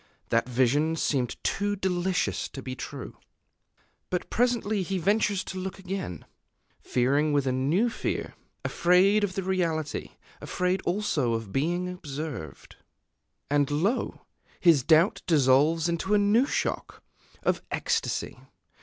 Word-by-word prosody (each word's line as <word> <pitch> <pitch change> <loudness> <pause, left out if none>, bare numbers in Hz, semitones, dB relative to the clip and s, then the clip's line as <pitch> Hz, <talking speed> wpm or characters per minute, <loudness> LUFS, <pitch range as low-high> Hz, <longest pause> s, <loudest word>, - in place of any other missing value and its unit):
That 115 +2 +1
vision 135 +6 +2
seemed 130 -6 0
too 205 0 0
delicious 185 -1 -1
to 135 - -8
be 130 -1 -5
true. 130 +1 -7 0.9
But 180 - -3
presently 230 -3 +1
he 190 +1 -2
ventures 200 +2 +1
to 190 - -6
look 190 0 -5
again, 190 - -5 0.6
fearing 140 +5 +1
with 140 -2 +2
a 130 - +1
new 145 - +2
fear, 230 - -3 0.3
afraid 190 +4 +4
of 190 -2 -1
the 195 - -2
reality, 170 -5 -2 0.3
afraid 180 +1 -1
also 175 - 0
of 115 -3 -4
being 175 - 0
observed; 150 - -7 0.7
and 145 -1 +2
lo! 175 - -1 0.3
his 165 -6 +5
doubt 170 - +4
dissolves 150 +2 +4
in 170 -1 -1
a 210 - +5
new 210 +6 +3
shock - - -3 0.4
of - - +1
ecstasy. 460 -1 -2
170 Hz, 125 wpm, -27 LUFS, 140-195 Hz, 0.9 s, his